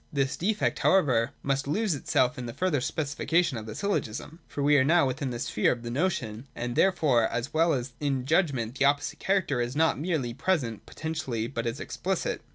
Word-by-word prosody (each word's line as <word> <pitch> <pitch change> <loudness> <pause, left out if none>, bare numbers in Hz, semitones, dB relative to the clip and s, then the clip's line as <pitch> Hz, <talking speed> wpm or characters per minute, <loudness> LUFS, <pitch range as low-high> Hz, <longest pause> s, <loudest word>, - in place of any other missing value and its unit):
This 140 0 0
defect 200 +7 0
however 130 -12 +3
must 135 0 0
lose 205 +6 +1
itself 130 -2 +1
in 125 - -5
the 115 - -7
further 180 -7 +1
specification 155 +3 0
of 110 - -9
the 110 - -6
syllogism. 160 - -3
For 145 - -4
we 145 +1 +5
are - - +4
now 165 +3 +4
within 135 +1 -2
the 120 - -4
sphere 105 -3 +1
of 120 -1 -4
the 120 - -4
notion; 130 -6 -2
and 120 0 -3
here - - +5
therefore, 140 -11 +2
as 120 +5 -4
well 165 +1 +3
as 125 -1 -3
in 140 -3 0
the - - -9
judgment, 135 - +1
the 140 - +4
opposite 145 +1 +1
character 185 -10 +1
is 120 +2 -3
not 160 0 +2
merely 150 -7 -1
present 125 - -1
potentially, 150 -8 -3
but 120 -1 -3
is 115 - -3
explicit. - - -2
140 Hz, 205 wpm, -28 LUFS, 120-160 Hz, -, we